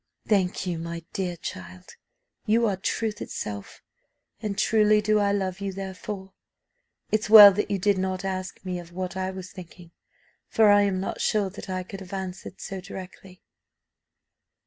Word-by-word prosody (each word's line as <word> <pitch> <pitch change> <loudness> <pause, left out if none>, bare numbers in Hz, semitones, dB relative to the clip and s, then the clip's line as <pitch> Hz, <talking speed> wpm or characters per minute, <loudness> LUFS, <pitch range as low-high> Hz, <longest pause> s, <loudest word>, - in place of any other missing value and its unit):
"Thank 195 -3 +1
you, 175 -3 -2
my 170 0 -6
dear 180 -3 -2
child, 90 - -9 0.5
you 230 +2 +3
are 205 -3 +1
truth 210 +3 -2
itself, 100 -1 -6 0.6
and 210 -3 -3
truly 215 -1 +4
do 210 0 +2
I 200 -1 +2
love 190 -2 -2
you 200 -1 -2
therefore. 190 0 -7 0.8
It's 215 -1 0
well 210 -2 +11
that 210 +2 -2
you 200 - 0
did 195 0 +1
not 190 0 -2
ask 185 0 -5
me 180 -1 -3
of 170 -1 -11
what 185 0 -4
I 190 0 -2
was 185 -1 -8
thinking, 175 -2 -12 0.6
for 220 -2 +4
I 205 0 +6
am 195 -2 +1
not 190 - -4
sure 205 -3 +1
that 195 - -10
I 185 0 -2
could 195 +2 -9
have 190 0 -11
answered 190 -1 -6
so 195 -1 -6
directly." 185 0 -11
190 Hz, 170 wpm, -26 LUFS, 185-205 Hz, 0.8 s, well